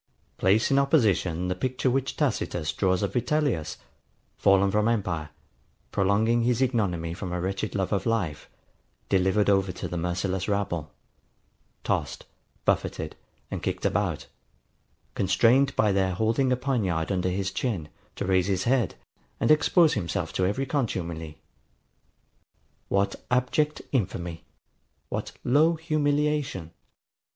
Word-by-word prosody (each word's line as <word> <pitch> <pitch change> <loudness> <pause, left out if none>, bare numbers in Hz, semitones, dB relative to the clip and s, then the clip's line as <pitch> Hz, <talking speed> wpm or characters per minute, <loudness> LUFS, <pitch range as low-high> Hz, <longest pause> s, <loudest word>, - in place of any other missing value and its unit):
] - - -41
Place 105 +7 +3
in 135 - +5
opposition 100 - +2
the 90 - 0
picture 130 +6 -1
which 135 +1 -1
Tacitus 80 -3 -1
draws 95 -1 +1
of 100 -1 -2
Vitellius, 125 - 0 0.6
fallen 100 0 +4
from 105 +2 +2
empire, 90 -9 -1 0.6
prolonging 110 +4 +2
his 120 0 +1
ignominy 100 -11 0
from 90 0 -5
a 90 - -2
wretched 95 +3 -3
love 95 0 0
of 100 - 0
life, 95 -10 -1 0.6
delivered 95 +2 +2
over 95 -2 +3
to - - -5
the 90 - -4
merciless 90 +3 -2
rabble; 85 -7 -1 0.9
tossed, - - -2 0.4
buffeted, - - -1 0.4
and - - -3
kicked - - -3
about; - - 0 0.9
constrained, 120 +8 +3
by 105 - +3
their 95 -1 +1
holding 115 +6 +1
a 125 - +2
poniard 105 -11 -1
under 95 -1 0
his 95 +1 -2
chin, 100 -12 -2 0.3
to - - -3
raise 95 -1 +2
his 95 -2 0
head, 125 -1 +1 0.4
and - - +3
expose 160 +1 +5
himself 85 -8 -2
to 90 - +1
every 130 +8 -1
contumely. 85 - -3 1.5
What 100 0 +1
abject 130 +5 +1
infamy! 90 - -2 0.6
What - - -4
low 155 +6 +4
humiliation! 150 - 0
100 Hz, 130 wpm, -26 LUFS, 90-125 Hz, 1.5 s, in